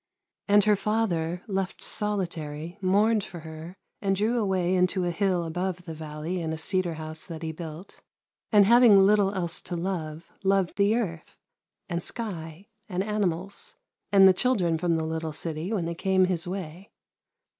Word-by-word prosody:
And 205 Hz, 0 st, +5 dB
her 210 Hz, 0 st, +4 dB
father, 180 Hz, -6 st, -1 dB
left 195 Hz, -2 st, -3 dB
solitary, 170 Hz, -5 st, -3 dB
mourned 205 Hz, +3 st, +3 dB
for 175 Hz, -3 st, -9 dB
her, 160 Hz, +2 st, -9 dB, 0.3 s
and 195 Hz, -2 st, +1 dB
drew 220 Hz, +5 st, +1 dB
away 190 Hz, -4 st, +1 dB
into 180 Hz, 0 st, +2 dB
a 175 Hz, -, 0 dB
hill 185 Hz, -1 st, +1 dB
above 180 Hz, +2 st, -3 dB
the 165 Hz, -, -6 dB
valley 155 Hz, +3 st, -5 dB
in 160 Hz, -1 st, -2 dB
a 160 Hz, -, -3 dB
cedar 175 Hz, 0 st, 0 dB
house 155 Hz, 0 st, -6 dB
that 165 Hz, -1 st, -7 dB
he 160 Hz, -, -2 dB
built; 160 Hz, +3 st, -9 dB, 0.5 s
and 205 Hz, -3 st, +7 dB
having 235 Hz, -1 st, +7 dB
little 205 Hz, -1 st, +4 dB
else 170 Hz, -3 st, -1 dB
to 175 Hz, -, -6 dB
love, 165 Hz, -3 st, -4 dB
loved 195 Hz, -2 st, +1 dB
the 200 Hz, +2 st, +3 dB
earth, 175 Hz, -9 st, -4 dB, 0.5 s
and 170 Hz, 0 st, -2 dB
sky, 175 Hz, -5 st, -5 dB, 0.2 s
and 185 Hz, 0 st, -1 dB
animals, 200 Hz, -2 st, -3 dB, 0.4 s
and 195 Hz, -1 st, +8 dB
the 190 Hz, -, +7 dB
children 180 Hz, -7 st, +1 dB
from 170 Hz, -1 st, +1 dB
the 160 Hz, -1 st, -1 dB
little 160 Hz, 0 st, -3 dB
city 160 Hz, +4 st, -4 dB
when 195 Hz, -7 st, -1 dB
they 170 Hz, -, -2 dB
came 190 Hz, +2 st, +2 dB
his 180 Hz, -2 st, -1 dB
way. 180 Hz, 0 st, -6 dB
180 Hz, 165 wpm, -27 LUFS, 165-200 Hz, 0.5 s, and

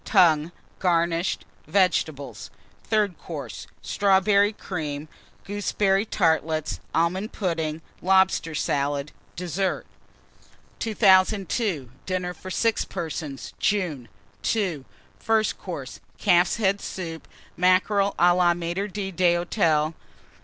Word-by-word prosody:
Tongue, 170 Hz, -5 st, +4 dB, 0.3 s
garnished. 170 Hz, -1 st, +1 dB, 0.2 s
Vegetables. 145 Hz, -, 0 dB, 0.4 s
THIRD 210 Hz, -5 st, +1 dB
COURSE. 140 Hz, -, -7 dB, 0.2 s
Strawberry 200 Hz, +1 st, +3 dB
Cream. 155 Hz, -8 st, -5 dB, 0.4 s
Gooseberry 200 Hz, 0 st, 0 dB
Tartlets. 160 Hz, -4 st, +1 dB
Almond 185 Hz, +6 st, 0 dB
Pudding. 165 Hz, -4 st, -2 dB, 0.2 s
Lobster 190 Hz, -3 st, +3 dB
Salad. 140 Hz, 0 st, -1 dB, 0.2 s
DESSERT. 180 Hz, +2 st, -2 dB, 0.9 s
2002. 195 Hz, -, +2 dB, 0.2 s
DINNER 180 Hz, -1 st, -2 dB
FOR 185 Hz, +2 st, -10 dB
6 225 Hz, +4 st, +1 dB
PERSONS 155 Hz, -4 st, -5 dB
(JUNE). 180 Hz, -, 0 dB, 0.5 s
II. 180 Hz, -11 st, -1 dB, 0.3 s
FIRST 220 Hz, -1 st, +1 dB
COURSE. 145 Hz, -9 st, -7 dB, 0.2 s
Calf's 175 Hz, -3 st, +3 dB
Head 200 Hz, -3 st, +1 dB
Soup. 165 Hz, -3 st, -6 dB, 0.3 s
Mackerel 195 Hz, +3 st, +3 dB
à 175 Hz, 0 st, +5 dB
la 175 Hz, -1 st, +4 dB
Maître 175 Hz, +4 st, -3 dB
d'Hôtel. 175 Hz, -4 st, +1 dB
180 Hz, 90 wpm, -25 LUFS, 160-195 Hz, 0.9 s, à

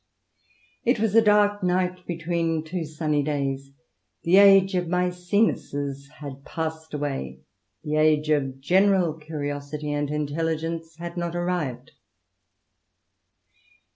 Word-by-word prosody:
' -, -, -36 dB, 0.3 s
It 240 Hz, -1 st, +2 dB
was 220 Hz, -2 st, +1 dB
a 225 Hz, -, +7 dB
dark 210 Hz, -1 st, +3 dB
night 180 Hz, 0 st, 0 dB
between 165 Hz, -1 st, -1 dB
two 165 Hz, +1 st, -4 dB
sunny 150 Hz, -1 st, -1 dB
days. 140 Hz, -2 st, -2 dB, 0.5 s
The 175 Hz, +3 st, +4 dB
age 195 Hz, -1 st, +7 dB
of 180 Hz, -1 st, 0 dB
Maecenases 180 Hz, -6 st, -1 dB
had 140 Hz, -2 st, -8 dB
passed 160 Hz, 0 st, -5 dB
away. 135 Hz, -, -4 dB, 0.4 s
The 150 Hz, 0 st, -1 dB
age 155 Hz, 0 st, +3 dB
of 135 Hz, -3 st, 0 dB
general 185 Hz, +1 st, +3 dB
curiosity 150 Hz, -1 st, -5 dB
and 145 Hz, -1 st, -1 dB
intelligence 160 Hz, +2 st, -2 dB
had 170 Hz, +1 st, -7 dB
not 170 Hz, 0 st, -2 dB
arrived." 170 Hz, -8 st, -2 dB
160 Hz, 115 wpm, -25 LUFS, 145-180 Hz, 0.5 s, a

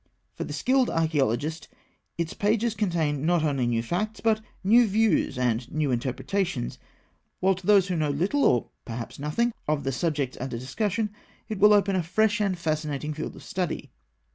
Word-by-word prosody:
For -, -, -5 dB
the -, -, -7 dB
skilled 260 Hz, -1 st, +2 dB
archaeologist, 155 Hz, -1 st, 0 dB, 0.5 s
its 170 Hz, -1 st, -2 dB
pages 215 Hz, +2 st, +1 dB
contain 165 Hz, -9 st, 0 dB
not 170 Hz, 0 st, +2 dB
only 140 Hz, -5 st, +1 dB
new 115 Hz, -1 st, 0 dB
facts, 210 Hz, -, -2 dB
but 220 Hz, -1 st, +2 dB, 0.2 s
new 230 Hz, +4 st, +6 dB
views 210 Hz, -, +2 dB
and 120 Hz, -1 st, 0 dB
new 150 Hz, -2 st, 0 dB
interpretations; 130 Hz, -, -2 dB, 0.6 s
while 190 Hz, +1 st, +3 dB
to 185 Hz, -1 st, -9 dB
those 200 Hz, -3 st, +6 dB
who 180 Hz, -, -1 dB
know 155 Hz, -2 st, 0 dB
little, 185 Hz, -, +1 dB
or 120 Hz, -, +3 dB
perhaps 115 Hz, +2 st, -6 dB
nothing, 225 Hz, +12 st, 0 dB
of 150 Hz, -2 st, 0 dB
the 135 Hz, -, -1 dB
subjects 140 Hz, -1 st, -1 dB
under 130 Hz, -2 st, -3 dB
discussion, 205 Hz, -, -1 dB, 0.4 s
it 215 Hz, -3 st, -3 dB
will 210 Hz, +1 st, +7 dB
open 200 Hz, -2 st, +4 dB
a 185 Hz, -, +2 dB
fresh 210 Hz, +5 st, +1 dB
and 195 Hz, -3 st, +1 dB
fascinating 155 Hz, -2 st, -2 dB
field 155 Hz, +1 st, -5 dB
of -, -, -12 dB
study. 180 Hz, -2 st, -3 dB
170 Hz, 170 wpm, -26 LUFS, 140-205 Hz, 0.6 s, will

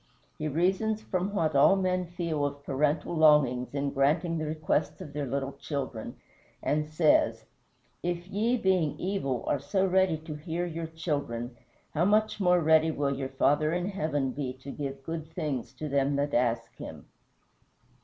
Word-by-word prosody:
He 155 Hz, -, -1 dB
reasons 190 Hz, +8 st, +1 dB
from 185 Hz, 0 st, -1 dB
what 160 Hz, -7 st, 0 dB
all 140 Hz, +7 st, +6 dB
men 185 Hz, -2 st, 0 dB
feel 170 Hz, -4 st, -2 dB
of 145 Hz, 0 st, -3 dB
parental 150 Hz, +4 st, 0 dB
longings 145 Hz, -5 st, +4 dB
in 140 Hz, 0 st, -1 dB
granting 160 Hz, +5 st, +1 dB
the 155 Hz, -, -2 dB
requests 155 Hz, -1 st, -1 dB
of 145 Hz, -, -9 dB
their 145 Hz, -1 st, -2 dB
little 135 Hz, +1 st, -2 dB
children, 135 Hz, -5 st, -5 dB, 0.5 s
and 150 Hz, +1 st, 0 dB
says, 155 Hz, 0 st, +3 dB, 0.6 s
"If 175 Hz, 0 st, -3 dB
ye, 220 Hz, +6 st, +1 dB
being 185 Hz, -8 st, +1 dB
evil, 175 Hz, -, -1 dB
are 145 Hz, -, +1 dB
so 190 Hz, +8 st, 0 dB
ready 190 Hz, -3 st, +3 dB
to 155 Hz, 0 st, -8 dB
hear 165 Hz, +3 st, -3 dB
your 165 Hz, -1 st, -4 dB
children, 145 Hz, -7 st, -3 dB, 0.4 s
how 160 Hz, +3 st, +2 dB
much 215 Hz, +1 st, +2 dB
more 180 Hz, -2 st, +4 dB
ready 160 Hz, 0 st, +5 dB
will 140 Hz, -3 st, 0 dB
your 135 Hz, 0 st, -3 dB
Father 145 Hz, +3 st, +2 dB
in 180 Hz, +2 st, -1 dB
heaven 150 Hz, -8 st, -1 dB
be 130 Hz, -2 st, -3 dB
to 130 Hz, +2 st, -9 dB
give 135 Hz, -2 st, -5 dB
good 160 Hz, +1 st, -5 dB
things 150 Hz, -8 st, -3 dB
to 155 Hz, -, -5 dB
them 140 Hz, 0 st, +1 dB
that 145 Hz, +1 st, -1 dB
ask 115 Hz, -1 st, 0 dB
him." -, -, -9 dB
155 Hz, 165 wpm, -29 LUFS, 140-175 Hz, 0.6 s, all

